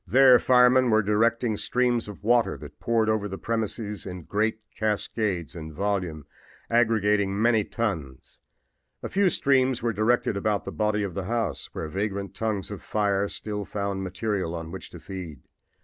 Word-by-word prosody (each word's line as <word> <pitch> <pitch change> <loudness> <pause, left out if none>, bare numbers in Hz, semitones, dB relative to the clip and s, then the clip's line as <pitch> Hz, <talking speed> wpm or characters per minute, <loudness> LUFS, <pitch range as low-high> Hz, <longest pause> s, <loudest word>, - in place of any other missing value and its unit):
"There 130 -1 +7
firemen 125 0 +5
were 110 -1 +4
directing 110 +2 +1
streams 125 -1 +1
of 105 -1 -10
water 120 +1 +3
that 75 0 -12
poured 115 -2 +1
over 110 -2 +1
the 95 -1 -6
premises 110 -2 -3
in 90 -2 -7
great 110 +5 0 0.2
cascades 105 -5 -1
in 80 -2 -7
volume, 90 -4 -2 0.5
aggregating 105 -4 +2
many 115 -1 +3
tons. 85 - -4 0.6
A - - -3
few 195 0 +3
streams 130 -6 +2
were 115 -1 +1
directed 110 +1 +1
about 100 +1 0
the - - -4
body 105 -1 0
of 95 -3 -3
the 95 +1 -4
house, 110 -8 -2
where 80 - -4
vagrant 100 +3 -3
tongues 105 -3 -2
of 105 - -6
flame 100 -1 0
still 105 -1 -4
found 100 -1 -3
material 95 -2 -2
on 80 -1 -6
which - - -8
to - - -11
feed. 90 -8 -8
105 Hz, 165 wpm, -26 LUFS, 95-115 Hz, 0.6 s, There